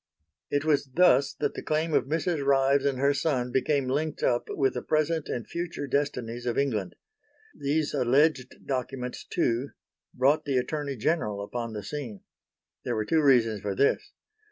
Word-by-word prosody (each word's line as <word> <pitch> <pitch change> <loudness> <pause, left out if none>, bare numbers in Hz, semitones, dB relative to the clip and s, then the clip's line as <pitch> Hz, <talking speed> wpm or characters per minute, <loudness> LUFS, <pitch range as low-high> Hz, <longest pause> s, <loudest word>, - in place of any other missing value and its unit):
It 145 +1 0
was 145 -3 +2
thus 145 -5 +4
that - - -1
the - - -6
claim 155 +1 -1
of - - +3
Mrs. 160 +1 -1
Ryves 135 0 +3
and 135 -2 0
her 140 +2 +3
son 135 -4 -1
became 135 +1 +1
linked 150 +4 -2
up 120 - +1
with 135 -2 +1
the 125 - -3
present 155 +1 0
and 120 - -4
future 170 -3 -4
destinies 125 -4 -2
of 120 - -1
England. 110 -10 -1 0.6
These 145 +2 -1
alleged 135 0 +1
documents 125 -1 -4
too, 120 +4 -1 0.5
brought 135 +4 +3
the 140 -3 0
Attorney 140 +2 -2
General 110 -6 -1
upon 115 +2 -5
the 105 -1 -5
scene. 120 -4 -6 0.6
There - - -2
were 110 -1 -1
two 160 +7 +2
reasons 115 -7 +3
for 100 -1 -3
this. 140 - +1
140 Hz, 165 wpm, -27 LUFS, 125-150 Hz, 0.6 s, thus